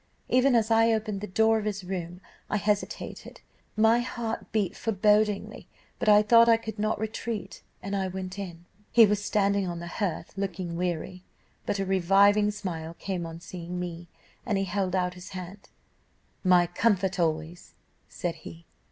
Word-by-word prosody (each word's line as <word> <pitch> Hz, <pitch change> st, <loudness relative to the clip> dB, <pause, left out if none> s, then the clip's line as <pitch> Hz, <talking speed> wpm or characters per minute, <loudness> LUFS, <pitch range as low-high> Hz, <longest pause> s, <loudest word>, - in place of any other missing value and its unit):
Even 255 Hz, 0 st, +4 dB
as 225 Hz, -1 st, +2 dB
I 225 Hz, 0 st, +5 dB
opened 215 Hz, -3 st, -1 dB
the 210 Hz, -, -4 dB
door 220 Hz, +3 st, +3 dB
of 215 Hz, -, -5 dB
his 200 Hz, -2 st, -3 dB
room 180 Hz, -1 st, -5 dB, 0.3 s
I -, -, +1 dB
hesitated, 205 Hz, 0 st, -3 dB, 0.4 s
my 225 Hz, +2 st, +5 dB
heart 235 Hz, -2 st, -4 dB
beat 205 Hz, -4 st, 0 dB
forebodingly, 210 Hz, -1 st, +1 dB, 0.3 s
but -, -, +1 dB
I 210 Hz, 0 st, +7 dB
thought 230 Hz, +2 st, +6 dB
I 230 Hz, -, +6 dB
could 220 Hz, -1 st, -7 dB
not 215 Hz, 0 st, 0 dB
retreat, 220 Hz, -1 st, -4 dB, 0.2 s
and 195 Hz, +1 st, -3 dB
I 190 Hz, -1 st, 0 dB
went 185 Hz, +1 st, -6 dB
in. 175 Hz, -3 st, -7 dB, 0.3 s
"He 230 Hz, -2 st, +8 dB
was 205 Hz, 0 st, 0 dB
standing 200 Hz, -1 st, +1 dB
on 175 Hz, -1 st, -4 dB
the 170 Hz, -, -7 dB
hearth 170 Hz, -2 st, -3 dB
looking 185 Hz, -3 st, -4 dB
weary, 180 Hz, +1 st, -3 dB, 0.4 s
but -, -, 0 dB
a 195 Hz, -, -1 dB
reviving 195 Hz, +3 st, +4 dB
smile 170 Hz, -6 st, -5 dB
came 180 Hz, -3 st, -4 dB
on 165 Hz, 0 st, -9 dB
seeing 175 Hz, 0 st, -6 dB
me, 175 Hz, -1 st, -6 dB, 0.4 s
and 215 Hz, -5 st, 0 dB
he 195 Hz, -, 0 dB
held 190 Hz, -1 st, -1 dB
out 180 Hz, -1 st, 0 dB
his 180 Hz, 0 st, -11 dB
hand 185 Hz, +3 st, -9 dB, 0.7 s
'My 180 Hz, -2 st, +5 dB
comfort 190 Hz, 0 st, +1 dB
always,' 160 Hz, +1 st, -2 dB, 0.3 s
said 175 Hz, -2 st, -4 dB
he. 165 Hz, 0 st, -12 dB
195 Hz, 170 wpm, -27 LUFS, 180-215 Hz, 0.7 s, He